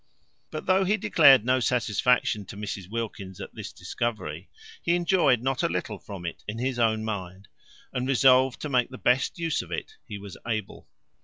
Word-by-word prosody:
But 155 - -6
though 190 +1 +3
he 200 +3 +2
declared 140 - +6
no 130 +1 +3
satisfaction 120 -2 +1
to 100 - -10
Mrs 100 -3 -5
Wilkins 100 -4 -5
at - - -8
this - - -7
discovery, 120 -2 -4 0.3
he 170 - +2
enjoyed 170 - +3
not 135 0 0
a - - +1
little 90 +4 -3
from 95 -4 -9
it 85 - -6
in 105 +1 -4
his 125 +1 -2
own 110 -1 +2
mind, 95 -3 -5 0.5
and 125 +1 -2
resolved 130 -1 +4
to 150 - -4
make 125 -3 +2
the 130 - -9
best 125 +7 +1
use 165 -2 -1
of 90 - -12
it 85 - -5
he 105 - -6
was 100 -1 -10
able. 110 -2 -4
120 Hz, 185 wpm, -26 LUFS, 105-135 Hz, 0.5 s, declared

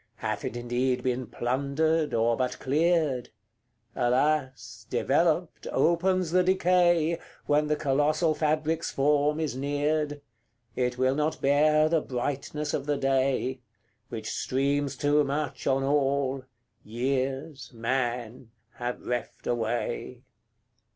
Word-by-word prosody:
Hath 110 -3 -3
it 120 - -4
indeed 125 +1 -1
been 125 -1 -1
plundered, 140 +6 0
or 115 +1 +2
but 125 0 -2
cleared? 150 -3 +1 0.7
Alas! 130 +2 0
developed, - - +1
opens 180 +1 +2
the 185 +1 +4
decay, 175 -3 +3 0.3
When 150 +1 +2
the 150 - +1
colossal 150 +3 +1
fabric's 155 +1 0
form 145 +2 +2
is 155 -5 -2
neared: 145 +2 -1 0.5
It 125 0 -1
will 130 +1 +2
not 150 +2 -1
bear 150 +2 +4
the 160 -1 +2
brightness 145 +4 -3
of 140 0 -2
the 145 -1 +1
day, 135 -1 +1 0.5
Which 110 -2 -5
streams 140 +2 -1
too 145 +1 +3
much 140 0 -3
on 135 0 +2
all, 135 -1 +1 0.4
years, 135 +5 -3
man, 120 -1 -2 0.3
have 120 0 -4
reft 120 -1 -4
away. 120 +1 -2
140 Hz, 115 wpm, -27 LUFS, 125-155 Hz, 0.7 s, the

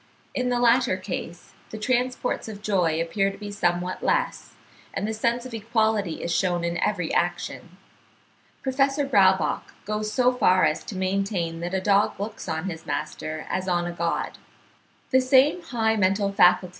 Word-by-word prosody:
In 250 -1 -1
the 245 -1 +1
latter 240 -4 +3
case 185 -2 -7 0.2
the 220 - -7
transports 250 +2 -1
of 210 -2 -8
joy 180 -6 +1
appear 195 +4 +1
to 195 - -9
be 205 0 -7
somewhat 180 -2 -1
less, - - -1 0.4
and 205 - -1
the 220 - -2
sense 235 +3 0
of 255 - -8
equality 220 -5 0
is 170 - -1
shewn 175 -2 +1
in 170 0 -1
every 180 -6 -1
action. 175 0 -2 0.9
Professor 275 +2 +1
Braubach 190 -8 +2
goes 215 0 -2
so 250 +1 +3
far 185 -6 +4
as - - 0
to 205 - -7
maintain 185 -3 -1
that 175 +2 -3
a - - +2
dog 200 +1 +2
looks 210 -2 -5
on 160 +3 -2
his 165 -3 -7
master 155 0 -4
as 185 0 -2
on 175 -1 +1
a 175 - -3
god. 170 0 -2 0.7
(78. 260 +5 +4
'Religion, 220 -2 +1
Moral, 195 +1 +2
etc. 180 -2 +5
200 Hz, 165 wpm, -25 LUFS, 175-225 Hz, 0.9 s, etc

